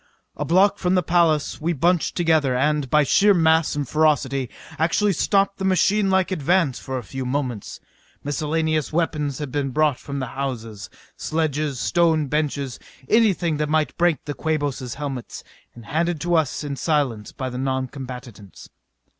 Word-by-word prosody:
A 150 - -3
block 185 +6 +3
from 180 0 +1
the 180 - +2
palace 160 -4 +1
we 170 +2 0
bunched 170 +3 +1
together 160 -7 +2
and, 145 +1 +1
by 150 +3 +4
sheer 200 +8 +4
mass 160 -2 +3
and 145 -2 -2
ferocity, 140 -4 +1 0.3
actually 195 +5 +2
stopped 195 +4 +1
the - - -3
machinelike 190 0 +2
advance 170 -4 +1
for 130 0 -5
a 125 - -5
few 130 +5 -6
moments. 125 -4 -3 0.4
Miscellaneous 155 +1 -1
weapons 155 -4 -1
had 145 -4 -5
been 140 0 -1
brought 150 0 +1
from 140 0 -6
the 130 - -2
houses 115 -7 -5 0.3
sledges, 155 -4 -1
stone 165 -2 +2
benches, 145 -4 -2 0.3
anything 190 -8 +3
that 150 0 -1
might 155 0 +1
break 175 -3 +1
the 145 - -3
Quabos' 145 -6 -2
helmets 140 -4 -6 0.3
and 120 -2 -12
handed 165 +5 -1
to 175 0 -1
us 155 -3 +1
in 145 -1 -4
silence 130 -8 -1
by 130 -1 -5
the 125 - -5
noncombatants. 130 -5 -6
150 Hz, 155 wpm, -22 LUFS, 135-165 Hz, 0.4 s, by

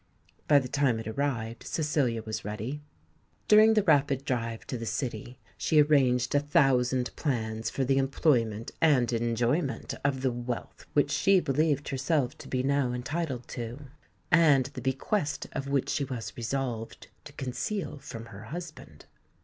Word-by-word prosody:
By 145 - +6
the 135 -2 +1
time 135 -3 +1
it 110 - -6
arrived 115 -2 -2
Cecilia 140 -8 -1
was 110 0 -5
ready. 110 +8 -5 0.7
During 215 +1 +7
the 215 - +4
rapid 140 -5 +2
drive 115 -4 -2
to - - -4
the 115 - -5
City, 120 -1 -4 0.2
she 155 - +3
arranged 130 -5 +3
a 145 - +5
thousand 130 -3 +2
plans 110 -5 -2
for 135 - -1
the 135 +1 +2
employment 120 -6 +1
and 130 -6 +4
enjoyment 120 +6 0
of 135 -1 0
the 130 - +2
wealth 120 0 -6
which 145 0 +2
she 195 +4 +4
believed 145 -1 0
herself 135 -1 0
to - - -10
be 130 -1 -1
now 135 -2 +1
entitled 130 0 -3
to, 120 +4 -6 0.4
and 155 -6 +5
the 130 - -6
bequest 145 - -1
of 135 0 -4
which 140 -2 0
she 145 - 0
was 125 -4 -5
resolved 120 -2 -4 0.2
to - - -11
conceal 145 - -4
from 115 -3 -8
her 105 +2 -10
husband. 165 +5 -9
135 Hz, 155 wpm, -28 LUFS, 120-145 Hz, 0.7 s, During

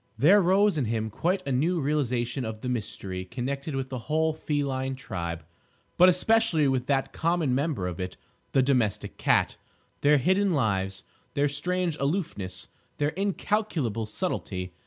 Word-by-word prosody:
There 180 - +6
rose 190 -1 +3
in 130 - 0
him 110 0 -2
quite 185 - 0
a 140 - -2
new 165 +8 +1
realisation 130 -4 0
of 110 -1 -5
the 125 - -3
mystery 100 -5 -3
connected 135 - -4
with 135 -1 -3
the 130 -1 -4
whole 160 +1 +2
feline 140 -4 -2
tribe, 85 - -5 0.5
but 180 +1 +7
especially 185 -4 +3
with 130 -1 0
that 135 -2 0
common 165 -5 +1
member 140 - 0
of 90 -1 -4
it, 90 0 -4 0.4
the 135 - +4
domestic 125 -7 0
cat—their 145 +1 +1
hidden 190 +7 +2
lives, 95 -7 0 0.3
their 145 0 +3
strange 175 +3 -1
aloofness, 140 - -2 0.3
their 145 0 +1
incalculable 185 - -1
subtlety. 95 - -3
140 Hz, 145 wpm, -27 LUFS, 115-165 Hz, 0.5 s, but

